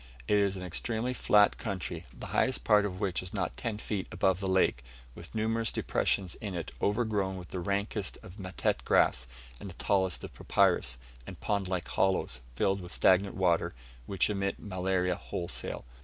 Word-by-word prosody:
It 105 Hz, -, +4 dB
is 100 Hz, -1 st, +1 dB
an 90 Hz, -, -6 dB
extremely 110 Hz, +7 st, -1 dB
flat 105 Hz, -4 st, +4 dB
country, 90 Hz, -5 st, -4 dB
the -, -, -9 dB
highest 130 Hz, -, +2 dB
part 105 Hz, -2 st, +5 dB
of 95 Hz, -2 st, -4 dB
which 95 Hz, -4 st, 0 dB
is 90 Hz, +2 st, -7 dB
not 95 Hz, -4 st, -1 dB
ten 115 Hz, -3 st, -3 dB
feet 105 Hz, -2 st, -3 dB
above 95 Hz, -1 st, +2 dB
the 95 Hz, -, -2 dB
lake, 95 Hz, -10 st, +2 dB, 0.3 s
with 85 Hz, -, -10 dB
numerous 115 Hz, +1 st, +1 dB
depressions 95 Hz, -3 st, 0 dB
in 100 Hz, -4 st, -4 dB
it 85 Hz, -3 st, -4 dB
overgrown 105 Hz, -3 st, +1 dB
with 90 Hz, -2 st, -9 dB
the 95 Hz, -, -4 dB
rankest 100 Hz, +2 st, -2 dB
of 90 Hz, +4 st, -11 dB
matete 95 Hz, -1 st, -1 dB
grass 65 Hz, 0 st, +3 dB, 0.3 s
and 100 Hz, -, -7 dB
the 85 Hz, -, -10 dB
tallest 95 Hz, -2 st, +1 dB
of -, -, -7 dB
papyrus, -, -, +2 dB, 0.3 s
and -, -, -8 dB
pond 100 Hz, -2 st, 0 dB
like 90 Hz, -2 st, -2 dB
hollows, 95 Hz, -9 st, +1 dB, 0.2 s
filled 95 Hz, +8 st, +1 dB
with 90 Hz, 0 st, -8 dB
stagnant 95 Hz, +1 st, +4 dB
water, 90 Hz, -7 st, +2 dB, 0.3 s
which 100 Hz, -, +2 dB
emit 100 Hz, -1 st, -1 dB
malaria 95 Hz, -2 st, 0 dB
wholesale. 85 Hz, -8 st, -4 dB
95 Hz, 175 wpm, -30 LUFS, 90-105 Hz, 0.3 s, part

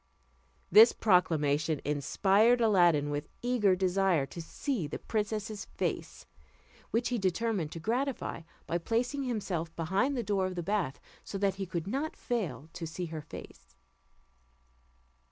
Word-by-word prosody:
This 225 Hz, +3 st, +9 dB
proclamation 155 Hz, -6 st, +2 dB
inspired 195 Hz, -, +3 dB
Aladdin 175 Hz, -10 st, +4 dB
with 145 Hz, +1 st, -3 dB
eager 230 Hz, -6 st, +3 dB
desire 185 Hz, -4 st, +2 dB
to 170 Hz, -, -8 dB
see 205 Hz, -, -3 dB
the 145 Hz, -, -5 dB
princess's 215 Hz, 0 st, -3 dB
face, -, -, -4 dB, 0.6 s
which 235 Hz, +1 st, 0 dB
he 245 Hz, -2 st, 0 dB
determined 190 Hz, -3 st, 0 dB
to 165 Hz, -, -6 dB
gratify, 245 Hz, -, -2 dB, 0.2 s
by 170 Hz, -, -1 dB
placing 245 Hz, -, -1 dB
himself 180 Hz, -9 st, -3 dB
behind 195 Hz, -, 0 dB
the 240 Hz, -, -1 dB
door 195 Hz, -3 st, 0 dB
of 185 Hz, -, -5 dB
the 175 Hz, -, -3 dB
bath, 190 Hz, -8 st, -1 dB, 0.2 s
so 200 Hz, -, -5 dB
that 195 Hz, -1 st, 0 dB
he 190 Hz, -, -2 dB
could 170 Hz, -2 st, -3 dB
not 275 Hz, +10 st, -2 dB
fail 205 Hz, -11 st, -3 dB
to 165 Hz, -, -5 dB
see 165 Hz, +3 st, -4 dB
her 155 Hz, -, -4 dB
face. 65 Hz, -, -12 dB
190 Hz, 140 wpm, -31 LUFS, 165-225 Hz, 0.6 s, This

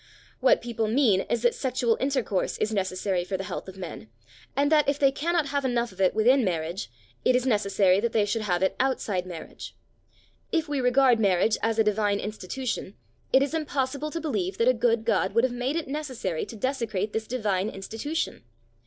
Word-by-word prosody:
What -, -, +4 dB
people 230 Hz, -2 st, -2 dB
mean 220 Hz, -5 st, +3 dB
is 235 Hz, 0 st, 0 dB
that 240 Hz, -, +4 dB
sexual 250 Hz, -3 st, 0 dB
intercourse 260 Hz, -8 st, -1 dB
is 215 Hz, +1 st, -1 dB
necessary 185 Hz, -2 st, -1 dB
for 190 Hz, +1 st, -3 dB
the 195 Hz, -, -4 dB
health 195 Hz, -, -6 dB
of 190 Hz, 0 st, -10 dB
men, 175 Hz, -11 st, -8 dB, 0.5 s
and 285 Hz, +2 st, +2 dB
that 300 Hz, -2 st, +4 dB
if 280 Hz, -, +1 dB
they 275 Hz, -2 st, +4 dB
cannot 320 Hz, +1 st, 0 dB
have 285 Hz, 0 st, -1 dB
enough 240 Hz, -3 st, 0 dB
of 185 Hz, -, -8 dB
it 185 Hz, -, +3 dB
within 250 Hz, +5 st, +4 dB
marriage, 170 Hz, -, -2 dB, 0.3 s
it 255 Hz, -, +4 dB
is 250 Hz, 0 st, +1 dB
necessary 200 Hz, -5 st, +3 dB
that 235 Hz, +2 st, 0 dB
they 215 Hz, -2 st, +2 dB
should 220 Hz, +2 st, -1 dB
have 185 Hz, -3 st, 0 dB
it 190 Hz, -, +1 dB
outside 210 Hz, -8 st, 0 dB
marriage. 170 Hz, -3 st, -9 dB, 0.8 s
If 325 Hz, -2 st, 0 dB
we 290 Hz, -2 st, -1 dB
regard 250 Hz, -1 st, +4 dB
marriage 200 Hz, +1 st, +3 dB
as 225 Hz, 0 st, 0 dB
a 220 Hz, -, +5 dB
divine 205 Hz, -1 st, +1 dB
institution, 215 Hz, +1 st, -4 dB, 0.4 s
it 265 Hz, -, +5 dB
is 280 Hz, -, -3 dB
impossible 290 Hz, -2 st, -2 dB
to 330 Hz, -, -4 dB
believe 210 Hz, -, -2 dB
that 230 Hz, -, +2 dB
a 255 Hz, -, +6 dB
good 230 Hz, -1 st, +1 dB
God 210 Hz, -3 st, +1 dB
would 230 Hz, -, +4 dB
have 260 Hz, -1 st, +1 dB
made 250 Hz, +4 st, -2 dB
it 330 Hz, -3 st, -2 dB
necessary 260 Hz, -, -3 dB
to -, -, -9 dB
desecrate 220 Hz, -4 st, -2 dB
this 220 Hz, 0 st, -2 dB
divine 210 Hz, -5 st, -1 dB
institution. 225 Hz, -, -4 dB
230 Hz, 195 wpm, -26 LUFS, 200-265 Hz, 0.8 s, a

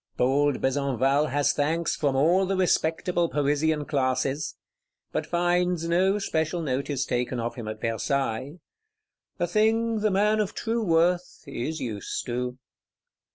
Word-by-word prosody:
Bold 140 Hz, +2 st, +2 dB
Besenval 135 Hz, +1 st, +1 dB
has 145 Hz, +1 st, +1 dB
thanks 160 Hz, +4 st, 0 dB
from 140 Hz, -3 st, 0 dB
all 175 Hz, +7 st, +3 dB
the 195 Hz, -, 0 dB
respectable 175 Hz, -1 st, +1 dB
Parisian 150 Hz, +1 st, +1 dB
classes; 135 Hz, +1 st, -1 dB, 0.6 s
but 155 Hz, -, -2 dB
finds 175 Hz, 0 st, +1 dB
no 185 Hz, +4 st, +2 dB
special 165 Hz, -3 st, -1 dB
notice 140 Hz, 0 st, -1 dB
taken 125 Hz, 0 st, -1 dB
of 115 Hz, 0 st, -2 dB
him 115 Hz, -3 st, -7 dB
at 110 Hz, 0 st, -5 dB
Versailles,—a 130 Hz, +4 st, -2 dB, 0.9 s
thing 220 Hz, +4 st, +2 dB
the 215 Hz, 0 st, +2 dB
man 210 Hz, +2 st, +2 dB
of 210 Hz, -2 st, -1 dB
true 230 Hz, 0 st, -1 dB
worth 175 Hz, 0 st, +1 dB
is 150 Hz, +3 st, -4 dB
used 105 Hz, -5 st, -4 dB
to. 125 Hz, +1 st, -3 dB
150 Hz, 130 wpm, -26 LUFS, 135-175 Hz, 0.9 s, all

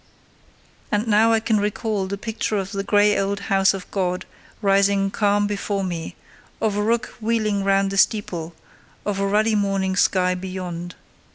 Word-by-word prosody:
And 210 Hz, +1 st, +1 dB
now 220 Hz, +1 st, +4 dB
I 225 Hz, -, +4 dB
can 220 Hz, -1 st, +1 dB
recall 205 Hz, -1 st, -1 dB
the 200 Hz, +1 st, -4 dB
picture 220 Hz, 0 st, -2 dB
of 195 Hz, 0 st, -3 dB
the 200 Hz, -2 st, -2 dB
grey 205 Hz, +1 st, +3 dB
old 200 Hz, 0 st, -1 dB
house 195 Hz, 0 st, +5 dB
of 190 Hz, -, -7 dB
God 180 Hz, -2 st, -1 dB, 0.3 s
rising 195 Hz, -1 st, +2 dB
calm 205 Hz, 0 st, +2 dB
before 200 Hz, -1 st, -2 dB
me, 170 Hz, -3 st, -4 dB, 0.4 s
of 215 Hz, -2 st, 0 dB
a 205 Hz, -, 0 dB
rook 230 Hz, +3 st, 0 dB
wheeling 215 Hz, -3 st, 0 dB
round 195 Hz, 0 st, +2 dB
the 195 Hz, -, -3 dB
steeple, 175 Hz, -6 st, 0 dB, 0.5 s
of 205 Hz, -2 st, -1 dB
a 200 Hz, -, +1 dB
ruddy 215 Hz, +2 st, +2 dB
morning 195 Hz, -2 st, 0 dB
sky 185 Hz, -1 st, +2 dB
beyond. 180 Hz, -1 st, -6 dB
200 Hz, 165 wpm, -22 LUFS, 190-210 Hz, 0.5 s, house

